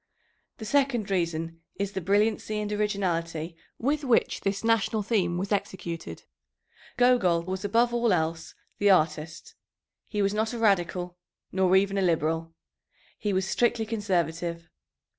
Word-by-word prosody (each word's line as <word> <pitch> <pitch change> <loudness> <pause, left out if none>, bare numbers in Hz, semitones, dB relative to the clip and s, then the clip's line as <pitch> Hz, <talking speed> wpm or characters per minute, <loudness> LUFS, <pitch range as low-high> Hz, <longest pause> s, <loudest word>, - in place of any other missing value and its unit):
The 220 - -7
second 245 -4 +1
reason 165 -2 -2
is 200 +1 -2
the 190 - -4
brilliancy 210 +3 +1
and 210 0 -3
originality 170 -6 -1 0.2
with 290 +5 0
which 250 -4 +2
this 195 +1 -2
national 225 -1 +2
theme 190 -5 0
was 195 +3 -3
executed. 180 -4 -4 0.7
Gogol 225 -10 +4
was 185 +1 -4
above 235 +4 +2
all 235 -2 +2
else 165 -2 -1 0.2
the 205 - +4
artist. 155 -3 +1 0.5
He 210 -2 -1
was 200 +1 +1
not 220 +2 -1
a - - -3
radical, 180 -4 +1 0.3
nor 190 0 +3
even 195 +1 +3
a - - +1
liberal. 165 -2 0 0.7
He 210 - -1
was 190 0 0
strictly 235 +1 +1
conservative. 175 -6 -2
195 Hz, 140 wpm, -27 LUFS, 170-215 Hz, 0.7 s, Gogol